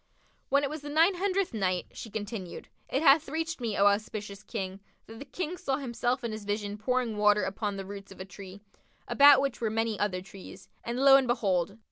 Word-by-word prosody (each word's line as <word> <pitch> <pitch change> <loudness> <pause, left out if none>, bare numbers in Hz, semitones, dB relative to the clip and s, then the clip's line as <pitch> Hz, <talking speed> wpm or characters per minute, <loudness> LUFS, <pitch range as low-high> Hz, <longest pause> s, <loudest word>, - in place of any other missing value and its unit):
When 280 +1 +3
it 280 - 0
was 310 -1 -6
the 290 - -7
Nine 325 +6 +4
Hundredth 385 -1 -1
Night, 185 -4 -1
She 225 - -9
continued: 205 -3 -6 0.2
It 275 - 0
hath 290 0 +5
reached 320 -1 -3
me, 225 -4 -2
O 200 - +4
auspicious 205 0 -1
King, 195 -3 -5 0.3
that 225 0 -12
the 280 - -8
King 355 +5 -5
saw 270 -6 -1
himself 245 -1 -2
in 235 - -2
his 215 -1 -6
vision 205 0 -3
pouring 240 0 -1
water 210 0 +4
upon 200 +1 -3
the 195 - -5
roots 200 0 -9
of 190 - -13
a 185 - -6
tree, 195 0 -11 0.5
about 280 -1 +7
which 275 -3 -2
were 225 - 0
many 225 0 -1
other 185 -3 -1
trees; 190 -1 -12
and 235 +1 -4
lo 270 0 +8
and 265 -2 +1
behold! 195 -5 0
225 Hz, 210 wpm, -29 LUFS, 200-275 Hz, 0.5 s, lo